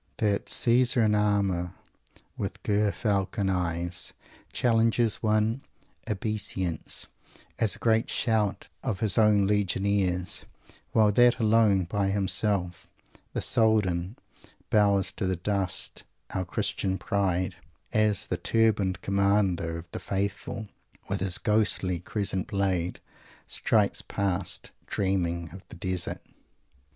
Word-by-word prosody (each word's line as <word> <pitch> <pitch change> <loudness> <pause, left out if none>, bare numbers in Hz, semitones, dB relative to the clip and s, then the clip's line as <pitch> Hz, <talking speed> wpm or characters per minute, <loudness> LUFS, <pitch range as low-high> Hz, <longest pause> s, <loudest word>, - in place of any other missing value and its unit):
That 105 -4 0
"Caesar, 120 0 +4
in 105 -1 +3
armour, 100 -4 +1 0.6
with - - -5
Ger 105 0 +2
Falcon 100 -2 -1
eyes," 85 -1 -1 0.4
challenges 115 -1 +2
one's 110 +3 +1 0.5
obeisance 100 -5 -2 0.5
as 110 -5 +2
a - - -12
great 115 -1 +1
shout 110 -4 0 0.2
of 95 - -2
his 110 -1 +3
own 105 -2 +4
legionaries, 95 -2 0 0.5
while 110 -2 +4
that 120 +3 +5
"Alone, 110 -4 +3
by 100 +3 -1
himself, 95 -2 0 0.5
the - - -1
Soldan" 105 -3 +2 0.5
bows 100 -2 +3
to 95 - -3
the 95 - 0
dust 95 +1 -2 0.3
our 95 -1 -2
Christian 95 +2 -1
pride, 95 -1 -1 0.4
as 105 -2 +2
the - - -2
Turbaned 105 -5 +1
Commander 100 -4 +1
of 85 +1 -9
the - - -5
Faithful, 100 +2 -3 0.4
with 100 0 -1
his 95 -1 +2
ghostly 105 -5 +1
crescent 95 0 -2
blade, 95 -3 -1 0.5
strides - - +1
past, 95 -2 -3 0.2
dreaming 85 -4 -1
of 95 0 -10
the - - -10
Desert. 90 -2 -3
100 Hz, 115 wpm, -27 LUFS, 95-105 Hz, 0.6 s, that